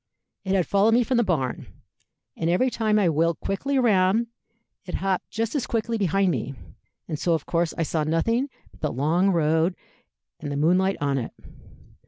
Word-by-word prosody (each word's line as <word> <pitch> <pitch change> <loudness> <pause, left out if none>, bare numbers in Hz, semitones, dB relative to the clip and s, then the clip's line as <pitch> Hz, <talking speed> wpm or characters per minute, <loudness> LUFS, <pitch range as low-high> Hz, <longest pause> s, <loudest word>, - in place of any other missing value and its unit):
It 190 0 0
had 185 -3 +2
followed 205 +3 +3
me 245 - +4
from 255 +1 0
the 240 - +4
barn, 150 - -2 0.7
and 165 - -1
every 250 +9 +2
time 215 -2 +1
I 200 -4 +3
wheeled 165 +1 +1
quickly 270 +8 -2
round, 215 -2 +3 0.6
it 180 - -6
hopped 190 -1 -1
just 225 +1 -2
as 285 -5 -1
quickly 230 0 -1
behind 195 0 +2
me, 135 -1 -3 0.5
and 155 - -4
so 170 -2 +2
of 155 - -4
course 170 -1 0
I 165 - +1
saw 155 0 -1
nothing 230 - 0 0.2
but - - -21
the 150 - -1
long 160 +9 +2
road 165 0 +2 0.6
and 145 -2 -5
the 140 - -2
moonlight 180 +6 +2
on 140 -1 +1
it. 115 - -6
185 Hz, 185 wpm, -24 LUFS, 160-215 Hz, 0.7 s, me